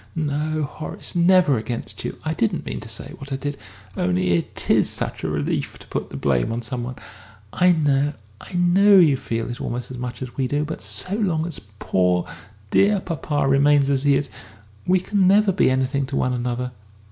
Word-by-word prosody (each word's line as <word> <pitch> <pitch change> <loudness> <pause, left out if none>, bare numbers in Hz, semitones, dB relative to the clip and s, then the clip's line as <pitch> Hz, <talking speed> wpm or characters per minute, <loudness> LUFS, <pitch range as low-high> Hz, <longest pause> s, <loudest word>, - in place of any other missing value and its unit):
"No, 155 0 -1
Horace, 150 +4 -6
never 175 -6 +4
against 115 +2 -5
you. - - -4
I 155 - 0
didn't 115 -7 -1
mean 60 +1 -4
to - - -9
say - - -6
what 140 +1 -10
I - - 0
did. 145 +1 -3 0.4
Only 90 0 +1
it 85 -1 -1
is - - +3
such - - -3
a 80 - -1
relief 75 -1 -2
to - - -14
put - - -3
the - - -7
blame 70 - +1
on 115 +1 -3
somebody. 125 +1 -5 0.5
I 180 0 +4
know, 145 -2 +2 0.3
I - - -12
know 185 +3 +5
you 160 -6 +6
feel 115 -3 -3
it 120 - -7
almost 125 +1 -4
as 125 - -7
much 125 0 -5
as 125 - -8
we 130 -2 0
do. 145 +3 0
But 160 - -5
so 185 - -3
long 180 -7 0
as 170 -4 -3 0.2
poor, 90 -3 +1 0.4
dear 200 0 +4
papa 145 -5 -2
remains 140 +1 +4
as 135 -1 +1
he 145 -1 +4
is, 140 +1 -1 0.6
we 185 +1 +4
can 190 0 +1
never 205 +1 +5
be 185 - +3
anything 130 +1 0
to 135 - -4
one 125 - +1
another. 125 0 -2
140 Hz, 200 wpm, -22 LUFS, 120-165 Hz, 0.6 s, you